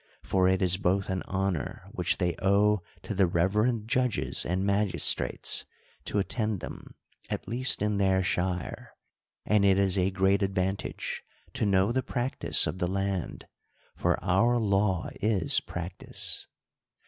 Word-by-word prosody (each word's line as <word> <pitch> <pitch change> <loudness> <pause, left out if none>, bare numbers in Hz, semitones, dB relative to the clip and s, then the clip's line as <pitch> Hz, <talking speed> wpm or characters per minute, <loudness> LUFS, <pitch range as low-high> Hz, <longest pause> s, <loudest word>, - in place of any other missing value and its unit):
For 95 -1 +1
it 95 +1 +2
is 90 0 +5
both 95 +1 0
an 95 - -2
honor 95 -4 -3
which - - -1
they 90 -2 -1
owe 100 +1 +3 0.2
to - - -5
the 95 -2 +2
reverend 105 +7 0
judges 120 - +1
and 90 +3 -1
magistrates, 100 -1 +3 0.4
to - - -2
attend 105 0 -1
them, - - -10 0.3
at - - -4
least 125 -2 0
in 105 -1 0
their 95 -1 +2
shire: 90 -1 -3 0.5
and 105 -1 +2
it 95 -1 +4
is 95 -1 +1
a 95 +1 +2
great 95 +1 +1
advantage 95 0 -3 0.3
to 105 - -1
know 95 +2 +2
the 130 +2 0
practice 125 +1 +3
of 90 - -4
the 90 - 0
land; 95 -1 -3 0.5
for - - 0
our 115 +7 +2
law 100 -4 0
is 105 -2 +1
practice. 90 +1 -4
95 Hz, 145 wpm, -28 LUFS, 95-105 Hz, 0.5 s, is